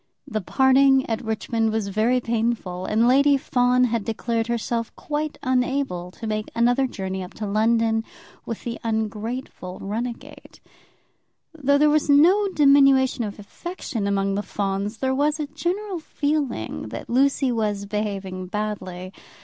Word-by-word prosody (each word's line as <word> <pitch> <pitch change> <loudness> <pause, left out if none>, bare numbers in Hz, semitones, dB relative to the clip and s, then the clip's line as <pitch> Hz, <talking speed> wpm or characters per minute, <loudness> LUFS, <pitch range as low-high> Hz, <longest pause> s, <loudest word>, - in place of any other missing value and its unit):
The 215 -5 -2
parting 265 +4 +4
at 225 0 -2
Richmond 220 0 -1
was 215 -2 -1
very 220 +5 +2
painful, 225 -6 -2
and 225 +2 +3
Lady 280 +2 +5
Fawn 250 -1 +2
had 235 -3 +1
declared 225 +1 -2
herself 235 0 -2
quite 300 0 -3
unable 255 -8 0
to 185 - -9
make 215 -1 -2
another 245 +3 +3
journey 190 -5 -4
up 180 - -9
to 215 - -4
London 225 +2 +2 0.4
with 230 - -6
the 235 -1 -5
ungrateful 220 -3 -3
runagate. 230 +4 -6 0.9
Though 285 -2 +2
there 300 +1 +4
was 300 -1 +1
no 355 +9 +5
diminution 275 -6 +4
of 205 -2 -5
affection 225 - -5
among 195 0 0
the 200 - 0
Fawns, 200 +1 -3
there 265 +2 0
was 295 +3 +1
a 300 - -1
general 355 +6 -3
feeling 285 - -2
that - - -7
Lucy 270 +1 +2
was 210 -3 -1
behaving 195 -3 -4
badly. 185 -3 -4
230 Hz, 140 wpm, -23 LUFS, 210-270 Hz, 0.9 s, Lady